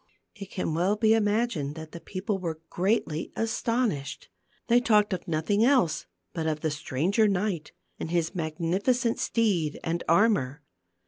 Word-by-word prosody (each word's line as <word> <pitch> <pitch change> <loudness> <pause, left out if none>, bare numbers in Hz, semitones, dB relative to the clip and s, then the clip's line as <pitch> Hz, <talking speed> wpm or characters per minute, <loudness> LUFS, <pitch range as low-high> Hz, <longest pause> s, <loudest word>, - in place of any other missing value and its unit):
It 200 -3 -9
can 180 -5 -2
well 180 +6 +2
be 220 +1 +4
imagined 210 -9 0
that 160 -1 -8
the 170 - -8
people 195 +3 -3
were 165 -3 -4
greatly 175 -4 0
astonished. 225 - -1 0.4
They 240 +1 +5
talked 210 -4 +3
of 185 - -5
nothing 170 +7 +1
else 240 - +3 0.3
but 160 -1 -2
of 155 -1 -1
the 155 - 0
stranger 155 - +1
knight 190 -5 -1 0.3
and - - -4
his 170 -1 0
magnificent 185 +9 0
steed 185 -10 0
and 170 +1 -2
armor. 165 - +3
185 Hz, 145 wpm, -27 LUFS, 160-220 Hz, 0.4 s, They